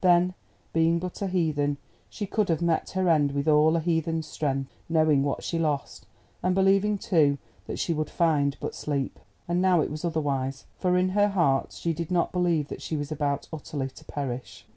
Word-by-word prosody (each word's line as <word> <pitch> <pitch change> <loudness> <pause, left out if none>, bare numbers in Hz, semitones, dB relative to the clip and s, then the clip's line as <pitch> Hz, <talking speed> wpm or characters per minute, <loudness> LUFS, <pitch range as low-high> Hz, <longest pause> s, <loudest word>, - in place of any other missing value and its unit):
Then 180 0 +5 0.4
being 165 +1 +3
but 180 +3 -5
a 200 - 0
heathen, 155 -6 0 0.3
she 210 - -4
could 205 0 0
have 165 -2 +2
met 165 -2 +1
her 190 -1 0
end 150 -4 +3
with 140 +2 -1
all 155 +1 +5
a - - +2
heathen's 165 -1 0
strength, 135 -3 -2 0.2
knowing 155 -3 +4
what 140 0 -1
she 165 - -2
lost, 150 -4 -2 0.3
and 180 +1 +1
believing, 195 +2 +3
too, 160 -10 +3 0.3
that - - -4
she 170 - 0
would 155 -1 -2
find 145 -4 +2
but - - -4
sleep. 140 -3 -3 0.3
And 175 +1 +1
now 185 -2 +4
it - - -2
was 150 +2 -5
otherwise, 140 -5 -1
for 180 -1 +2
in 185 +1 +2
her 205 +2 +3
heart 170 -9 +1
she 170 - -2
did 165 0 -4
not 175 -2 +1
believe 170 -5 +1
that - - -7
she 155 - -3
was 145 +1 -4
about 145 -2 -1
utterly 145 -3 -4
to - - -14
perish. 130 -3 -5
160 Hz, 200 wpm, -27 LUFS, 145-180 Hz, 0.4 s, Then